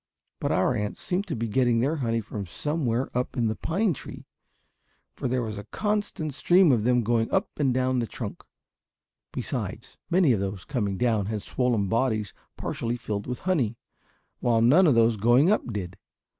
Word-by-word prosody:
But - - -1
our 90 +9 +2
ants 105 -3 -3
seemed 190 +3 -2
to 160 - -2
be 115 0 -2
getting 120 +1 +2
their 140 +7 +1
honey 115 -4 0
from 105 -2 -6
somewhere 130 - -2
up 125 +2 -2
in 120 - +2
the 110 0 0
pine 195 +3 0
tree, - - -10 0.9
for - - -3
there 125 0 0
was 105 -2 -4
a - - -7
constant 205 - -2
stream 175 +3 +5
of 115 -5 +2
them 125 -1 +3
going 115 0 +1
up - - 0
and 140 -3 +3
down 130 0 +1
the 115 - -1
trunk. - - -6 0.9
Besides, - - -4
many 175 -5 +4
of 110 - +2
those 95 -1 -4
coming 105 -8 -2
down 110 -4 +1
had 105 -1 -3
swollen 120 -6 0
bodies 110 -2 0 0.2
partially 120 +1 -3
filled 105 -3 -4
with 125 0 -4
honey, 130 - +1 0.6
while 115 -2 +2
none 160 +10 +6
of 140 - +4
those 115 -1 +4
going 120 - +4
up 210 - 0
did. 95 -3 -5
120 Hz, 185 wpm, -26 LUFS, 110-135 Hz, 0.9 s, none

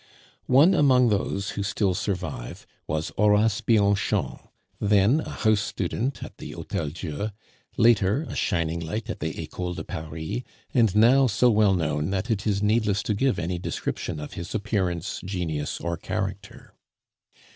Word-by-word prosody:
One 145 +9 +6
among 130 -7 +5
those 100 0 -1
who 100 - -4
still 100 -1 0
survive 90 - -4 0.2
was 80 +1 -2
Horace 105 0 +3
Bianchon, 100 -3 +1 0.4
then 105 +7 +4
a - - -5
house 110 -2 +2
student 110 +7 -3
at - - -10
the - - -7
Hotel 75 - -3
Dieu; 80 +6 -4 0.5
later, 110 +3 +4
a - - -6
shining 85 -1 0
light 110 +8 -4
at - - -7
the 80 - -4
Ecole 90 +2 -4
de - - -5
Paris, 80 +8 -5 0.3
and 115 -6 +3
now 130 +5 +6
so 120 +2 +3
well 105 -3 +4
known 75 -2 -1
that 100 +4 -2
it 105 -1 -1
is 100 -1 +1
needless 105 -2 +2
to 105 - 0
give 130 +5 +1
any 85 +1 -2
description 80 - -4
of 75 - -7
his 85 +4 -6
appearance, 95 -5 -2
genius, 85 -6 -3
or 85 0 -3
character. - - -5
100 Hz, 155 wpm, -25 LUFS, 85-110 Hz, 0.5 s, One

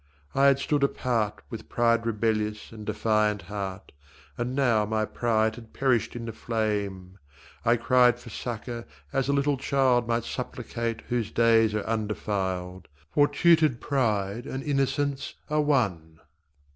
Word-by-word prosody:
I 135 +1 +4
had 140 -1 +5
stood 145 +1 0
apart 120 -6 0
With 115 - -8
pride 115 -1 +2
rebellious 105 -1 -1
and 110 -2 -10
defiant 105 -3 +1
heart, 100 0 -6 0.4
And 120 +2 -3
now 120 -6 +3
my 110 +1 0
pride 110 -1 +1
had 115 -2 -13
perished 125 -5 +1
in 120 -1 -5
the 115 - -5
flame. 100 -5 -3 0.4
I 120 - +4
cried 125 +1 +4
for 120 -1 -12
succour 120 +1 -5 0.3
as 135 0 0
a - - +3
little 140 0 +2
child 130 -3 +2
Might 115 -1 0
supplicate 115 -1 -4
whose 120 -3 -1
days 115 -2 +4
are 105 - -1
undefiled 95 -5 -2 0.2
For 145 -1 +4
tutored 160 -8 +3
pride 110 -5 -1
and 135 0 -4
innocence 140 0 -1 0.2
are 150 0 +3
one. 95 - 0
115 Hz, 145 wpm, -27 LUFS, 105-130 Hz, 0.4 s, had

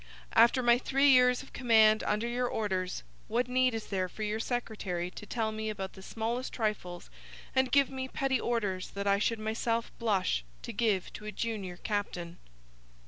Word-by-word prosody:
After 235 +3 +5
my 240 0 +5
three 275 +2 +4
years 250 -1 +5
of - - -16
command 220 -3 +5
under 210 +3 0
your 245 +1 0
orders 190 -6 -2 0.2
what 240 +3 0
need 255 -1 +2
is 220 - -4
there 185 -2 -2
for 215 - -6
your 210 +1 -1
secretary 210 -7 -3
to 210 - -10
tell 220 -1 -1
me 220 0 -3
about 195 -3 -5
the 190 - -12
smallest 230 +5 -3
trifles 210 -6 -3 0.4
and 260 -1 +3
give 280 0 +4
me 260 0 -4
petty 265 -1 0
orders 205 -7 -1
that 200 0 -3
I 200 0 +3
should 230 +2 +1
myself 225 +1 -1
blush 195 - +1 0.2
to - - -6
give 210 -6 0
to 210 - -9
a 215 - -4
junior 210 -6 -4
captain?' 180 -4 -3
220 Hz, 180 wpm, -30 LUFS, 200-245 Hz, 0.4 s, After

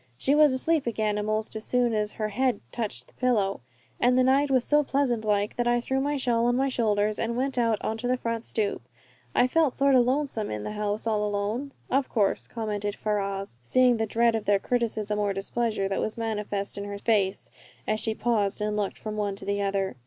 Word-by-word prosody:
She 270 - +1
was 300 -1 +6
asleep 285 +2 +1
again 215 -2 0
a'most 215 +1 -1
as 215 - -4
soon 245 -1 +1
as 210 -1 0
her 215 -1 -2
head 245 +1 0
touched 210 - -4
the - - -23
pillow, 210 - 0 0.4
and 250 +1 +3
the 255 - +5
night 275 +3 +3
was 255 -2 +2
so 295 0 +4
pleasant 270 -5 0
like 205 -1 0
that 240 0 0
I 240 0 +3
threw 265 +2 -1
my 290 +1 0
shawl 240 -3 +1
on 245 - +2
my 270 +1 +2
shoulders 215 -4 +1
and 235 +1 -1
went 270 +1 -1
out 230 -3 +2
onto 225 +2 -2
the 255 +1 +1
front 230 -2 -3
stoop. 210 -3 -1 0.5
I 245 - +5
felt 295 +1 +2
sort 275 0 +3
o' 255 - +7
lonesome 255 -3 0
in 105 -1 -4
the - - -4
house 210 0 -2
all 215 -2 +1
alone." 210 +7 -2 0.2
"Of 270 0 +1
course," 205 -4 0
commented 210 -3 -3
Ferrars, 195 - -3
seeing 245 - +3
the 225 0 -1
dread 230 +2 +2
of 220 -2 -2
their 205 -1 +4
criticism 215 -2 -1
or 205 -1 +1
displeasure 205 +1 -1
that 195 - -1
was 215 - -3
manifest 210 -3 -3
in 200 - -5
her 205 0 -5
face 200 -3 0 0.3
as 215 0 0
she 220 0 -1
paused 215 -4 0
and 210 0 -1
looked 205 -2 -2
from 215 -1 -6
one 205 -2 -1
to 195 - -8
the 200 0 -1
other. 195 -4 -1
220 Hz, 220 wpm, -27 LUFS, 205-250 Hz, 0.5 s, o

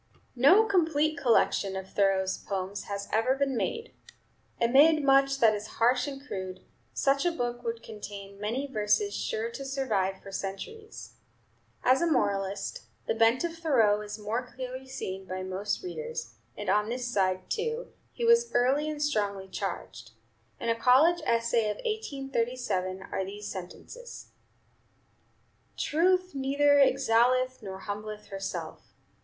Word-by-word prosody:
No 335 - +6
complete 315 -6 +2
collection 205 -6 +2
of 190 0 -5
Thoreau's 190 -1 +2
poems 195 0 -4
has 200 0 -5
ever 225 +5 +3
been 275 -1 0
made. 460 - -3 0.7
Amid 285 +6 +5
much 275 0 +4
that 225 -4 +5
is 210 0 -4
harsh 250 +3 +3
and 275 0 -7
crude, 185 -6 -6 0.3
such 275 +1 +1
a 350 - +2
book 240 -6 -3
would 230 -1 -4
contain 200 -2 -9
many 235 +7 -2
verses 270 - +1
sure 455 0 -2
to 275 - -7
survive 220 -9 -1
for 195 - -9
centuries. 310 - -7 0.7
As 255 +4 +4
a 340 - +2
moralist, 195 -5 -1 0.2
the - - 0
bent 225 +4 +3
of 335 -1 -2
Thoreau 230 -11 +3
is 210 0 -6
more 215 +4 -2
clearly 255 +1 -7
seen 190 -7 -5
by 185 0 -4
most 190 - -3
readers; 470 +6 -5 0.2
and - - -6
on 210 +1 +2
this 245 +1 -3
side, 185 -5 0
too, 460 +2 -3 0.2
he 475 - -3
was 470 0 +5
early 270 +5 +3
and 300 -1 -3
strongly 200 -8 -1
charged. 190 - -6 0.5
In 235 - -2
a 230 - +3
college 275 +9 +5
essay 230 -1 +2
of 210 - -2
1837 245 - -2
are 190 - -3
these 205 +2 -7
sentences: 210 - -9 1.5
"Truth 365 +4 +2
neither 285 +1 +3
exalteth 255 -1 +3
nor 190 -2 -7
humbleth 210 +1 -6
herself. 195 -1 -6
240 Hz, 140 wpm, -29 LUFS, 200-285 Hz, 1.5 s, No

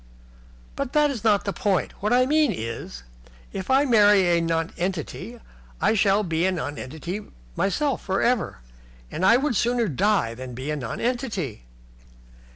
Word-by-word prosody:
"But 275 -2 -4
that 300 -1 +4
is 235 -6 -6
not 205 -4 +3
the 200 - -1
point. 200 -6 0
What 210 +3 0
I 250 +1 +4
mean 300 -1 +3
is, 115 - -6 0.5
if 190 -1 -5
I 270 +2 +4
marry 205 -7 +5
a 170 - +2
nonentity 170 +6 -3 0.4
I 205 +6 +3
shall 205 -1 +3
be 165 -3 -1
a - - +1
nonentity 160 +3 -5 0.3
myself 275 +6 0
for 190 0 -1
ever. 235 - 0 0.5
And 175 - -4
I 230 +5 +6
would 270 -1 0
sooner 240 +1 +1
die 185 - +1
than 125 0 -8
be 130 +5 -4
a - - -1
nonentity." 180 - -3
200 Hz, 155 wpm, -24 LUFS, 165-240 Hz, 0.5 s, I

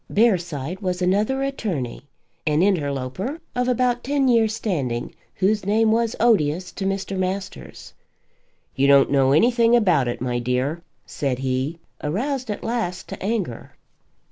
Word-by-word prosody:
Bearside 175 - +1
was 185 -3 -2
another 210 +9 +1
attorney, 190 - -3 0.5
an 155 +3 +3
interloper 170 - -1 0.2
of 250 0 0
about 245 -1 +1
ten 280 0 +1
years' 225 -3 +3
standing, 135 - -2 0.2
whose 205 +3 +1
name 220 +3 +2
was 230 0 +1
odious 180 -6 +2
to 195 - -5
Mr. 195 0 -2
Masters. 190 +1 -5 0.8
"You 135 +1 +2
don't 140 -1 +5
know 135 -1 +4
anything 235 - +4
about 180 - +3
it, 120 - -3
my 125 -1 -1
dear," 125 +7 -1 0.2
said 135 -3 -2
he, 130 +4 -2 0.3
aroused 245 - -2
at 210 - -4
last 225 -6 -3
to - - -7
anger. 195 - -3
190 Hz, 140 wpm, -23 LUFS, 140-230 Hz, 0.8 s, don't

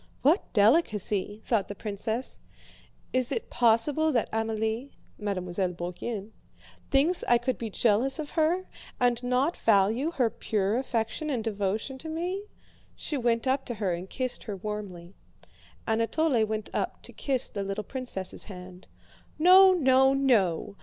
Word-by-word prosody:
"What 315 +8 +3
delicacy!" 210 - +2
thought 220 -5 +1
the 205 - -6
princess. 220 +4 -3 0.7
"Is 255 -1 +2
it 460 - -3
possible 255 +7 +3
that 235 -5 0
Amélie" 225 +3 -2 0.3
(Mademoiselle 185 -3 -2
Bourienne) 190 +5 -5 0.6
"thinks 305 +6 +2
I 240 - +5
could 240 +1 -2
be 230 - -4
jealous 235 - +2
of 305 -2 -5
her, 335 +3 +1 0.3
and 245 -1 +2
not 255 +6 +1
value 220 +7 +2
her 255 -9 0
pure 205 -2 -1
affection 255 +3 -2
and 250 -6 -1
devotion 215 +4 -2
to 320 - -8
me?" 360 +5 -3 0.5
She 300 - -5
went 235 -2 0
up 265 +1 +1
to 240 - -4
her 200 -4 -1
and 175 +2 -6
kissed 255 -2 -2
her 210 - -4
warmly. 195 -3 -6 0.7
Anatole 230 +3 +1
went 215 -1 -4
up - - -3
to - - -11
kiss 265 -3 0
the 200 - -4
little 195 +2 -3
princess' 245 -8 -3
hand. 180 -2 -11 0.5
"No! 370 +4 +7
No! 265 -4 +4
No! 200 -9 +1
230 Hz, 145 wpm, -28 LUFS, 205-270 Hz, 0.7 s, No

